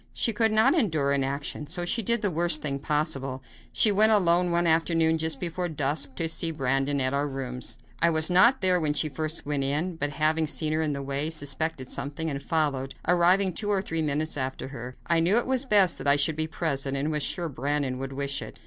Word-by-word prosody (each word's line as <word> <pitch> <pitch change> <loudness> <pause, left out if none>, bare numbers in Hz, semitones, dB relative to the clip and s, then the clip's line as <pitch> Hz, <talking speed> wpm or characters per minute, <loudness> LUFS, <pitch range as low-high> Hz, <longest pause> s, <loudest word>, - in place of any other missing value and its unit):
She 230 - -1
could 220 +1 +2
not 220 +6 +4
endure 160 - +1
inaction, 140 +2 -2
so 175 +3 -3
she 230 +6 +1
did 235 +1 +1
the 205 - +1
worst 170 -1 +2
thing 140 -2 -2
possible. 135 -3 -1 0.3
She 215 - +4
went 215 +2 +4
alone, 180 -3 +3
one 170 0 +1
afternoon, 165 0 +2
just 160 -3 0
before 175 +1 -3
dusk, 140 -2 -2
to 165 - -1
see 165 +1 0
Brandon 135 -1 -1
at 130 0 0
our 140 +1 0
rooms. 125 -4 -5 0.2
I 170 - +4
was 160 -1 +1
not 235 +9 +5
there 185 -1 +3
when 150 -2 0
she 155 +1 -1
first 155 +3 -2
went 145 -1 -1
in, 155 +6 -2
but, 145 -1 -1
having 155 +1 0
seen 155 0 +1
her 160 - 0
on 155 -2 -1
the 140 0 -5
way, 140 +3 -2
suspected 145 -2 -3
something 150 +4 -4
and 140 0 -5
followed, 140 -4 -1
arriving 180 +2 +3
two 205 +4 -2
or 200 -2 +2
three 165 -3 -3
minutes 155 +1 -1
after 130 0 -4
her. 125 -2 -8
I 170 -1 +2
knew 175 +7 +3
it 240 - +2
was 260 +1 -1
best 200 -7 +3
that 135 - -4
I 140 - +5
should 145 +2 +1
be 155 0 -2
present, 140 -4 -1
and 145 +3 -1
was 150 -1 -2
sure 175 +3 -1
Brandon 140 -2 -2
would 135 0 -5
wish 140 0 -2
it. - - -9
155 Hz, 225 wpm, -26 LUFS, 140-175 Hz, 0.3 s, not